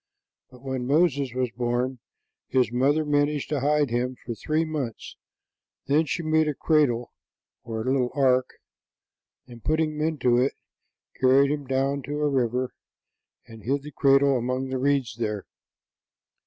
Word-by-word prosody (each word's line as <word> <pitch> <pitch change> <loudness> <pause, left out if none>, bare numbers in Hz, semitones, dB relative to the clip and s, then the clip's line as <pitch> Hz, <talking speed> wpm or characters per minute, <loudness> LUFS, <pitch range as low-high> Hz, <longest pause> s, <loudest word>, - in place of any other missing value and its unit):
But 125 0 -17
when 130 -2 -3
Moses 140 -3 +2
was 130 -2 -1
born, 125 +1 -2 0.5
his 125 -3 +1
mother 140 +5 +2
managed 145 0 0
to 150 -1 0
hide 145 -1 +1
him 125 +1 -1
for 120 - -3
three 155 +7 -1
months; 145 -8 -5 0.7
then 155 +3 +2
she 170 +5 -2
made 155 0 +2
a 150 - -1
cradle, 130 -8 +1 0.5
or 110 -1 -4
little 130 -1 +1
ark, 130 -2 +3 1.0
and 120 -2 -13
putting 155 0 +1
him 150 0 -5
into 140 -6 +2
it, 130 +2 +1 0.7
carried 135 +2 +5
him 145 -2 -3
down 135 +2 0
to 145 +1 -3
a 150 - +2
river 125 -2 0 0.7
and 115 -1 -13
hid 135 +5 -1
the 150 - -9
cradle 135 -1 +4
among 130 +2 -2
the 130 0 -2
reeds 135 -4 0
there. 105 -3 -2
135 Hz, 150 wpm, -25 LUFS, 125-145 Hz, 1.0 s, carried